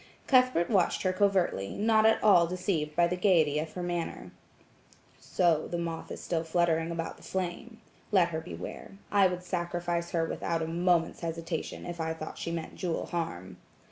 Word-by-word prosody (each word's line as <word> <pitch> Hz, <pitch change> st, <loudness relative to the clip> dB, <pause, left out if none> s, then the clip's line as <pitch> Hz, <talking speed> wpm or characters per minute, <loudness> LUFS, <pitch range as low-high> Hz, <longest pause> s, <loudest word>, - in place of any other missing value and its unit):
Cuthbert 255 Hz, -10 st, +4 dB
watched 190 Hz, -5 st, +2 dB
her 185 Hz, -1 st, +1 dB
covertly, 185 Hz, -, +1 dB
not 220 Hz, 0 st, +4 dB
at 220 Hz, -, +3 dB
all 180 Hz, -5 st, +6 dB
deceived 170 Hz, -4 st, -2 dB
by 175 Hz, +1 st, +5 dB
the 175 Hz, +1 st, 0 dB
gaiety 165 Hz, -6 st, +3 dB
of 155 Hz, +1 st, -4 dB
her 180 Hz, -, -4 dB
manner. 175 Hz, -1 st, -4 dB, 0.9 s
"So, 170 Hz, -4 st, +1 dB
the 175 Hz, -, -3 dB
moth 165 Hz, -1 st, -4 dB
is -, -, -6 dB
still 165 Hz, -2 st, -2 dB
fluttering 165 Hz, -1 st, +1 dB
about 165 Hz, -1 st, -4 dB
the -, -, -18 dB
flame. 190 Hz, +5 st, -4 dB, 0.3 s
Let 185 Hz, -4 st, +4 dB
her 160 Hz, -1 st, -3 dB
beware; 170 Hz, -, -8 dB, 0.2 s
I 200 Hz, -2 st, +5 dB
would 180 Hz, 0 st, -4 dB
sacrifice 175 Hz, -1 st, -2 dB
her 165 Hz, -1 st, 0 dB
without 165 Hz, 0 st, -2 dB
a -, -, -3 dB
moment's 170 Hz, 0 st, +1 dB
hesitation 165 Hz, -1 st, -4 dB
if 175 Hz, -1 st, -5 dB
I 160 Hz, 0 st, -2 dB
thought 155 Hz, -1 st, -7 dB
she -, -, -3 dB
meant 165 Hz, -1 st, -4 dB
Jewel 175 Hz, -4 st, -2 dB
harm." 95 Hz, -, -4 dB
170 Hz, 175 wpm, -29 LUFS, 165-185 Hz, 0.9 s, all